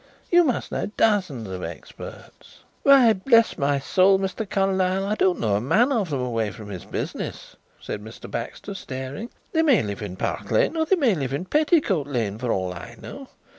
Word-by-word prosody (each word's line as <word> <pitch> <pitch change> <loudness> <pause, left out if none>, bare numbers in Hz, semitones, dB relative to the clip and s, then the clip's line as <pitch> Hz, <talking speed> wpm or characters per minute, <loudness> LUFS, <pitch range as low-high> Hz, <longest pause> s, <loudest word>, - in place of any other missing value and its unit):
You 350 0 +7
must 265 -7 -1
know - - -2
dozens 185 - +1
of 95 -1 -6
experts." 85 0 -10 0.2
"Why, 265 -5 +7
bless 230 +3 +3
my 140 -2 +1
soul, 185 +7 +4
Mr. 195 +2 -3
Carlyle, 190 -1 +1
I 205 - 0
don't 190 -4 +2
know 110 -3 +1
a - - -2
man 230 - +3
of 215 -9 0
them 140 -4 -1
away 115 -4 -1
from 105 0 -10
his 90 -3 -7
business," - - -5 0.2
said 105 - -6
Mr. 110 +1 -11
Baxter, 200 - -5
staring. 135 - -6 0.2
"They 320 - +2
may 280 - +4
live 100 -1 -5
in 100 -3 -5
Park - - -3
Lane - - +2
or 320 -1 +1
they 385 - +4
may 270 - +3
live 135 -6 -3
in 150 +6 -2
Petticoat 290 - +2
Lane 115 -6 -2
for 125 -1 -1
all 95 -1 -1
I 105 +7 -9
know. 270 -1 -9
185 Hz, 195 wpm, -24 LUFS, -, 0.2 s, You